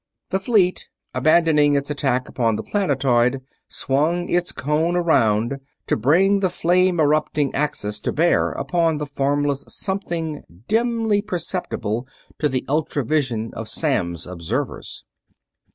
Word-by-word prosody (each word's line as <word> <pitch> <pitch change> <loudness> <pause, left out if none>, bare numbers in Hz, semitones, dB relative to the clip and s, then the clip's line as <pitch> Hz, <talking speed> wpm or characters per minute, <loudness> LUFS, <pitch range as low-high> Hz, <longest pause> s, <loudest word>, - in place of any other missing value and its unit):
The 190 - +1
fleet, 195 -4 +1 0.2
abandoning 150 +1 +4
its 140 +1 -1
attack 130 -3 0
upon 115 -3 0
the - - -4
planetoid, 135 - +1 0.3
swung 160 +6 0
its 175 0 +1
cone 155 +5 0
around, 130 -7 +2 0.3
to - - +1
bring 180 - +3
the 190 -2 +1
flame 180 +1 +2
erupting 150 -2 +1
axis 135 -8 -1
to - - -2
bear 170 +3 +2
upon 165 -3 0
the 150 - -3
formless 145 0 0
something 170 -6 -2 0.3
dimly 225 -2 +1
perceptible 165 - -3 0.3
to 150 - +2
the 130 -1 -2
ultra 145 -2 -1
vision 120 -6 -1
of 115 -1 -6
Samms' 100 - -1
observers. 85 -2 -5
150 Hz, 125 wpm, -22 LUFS, 130-175 Hz, 0.3 s, abandoning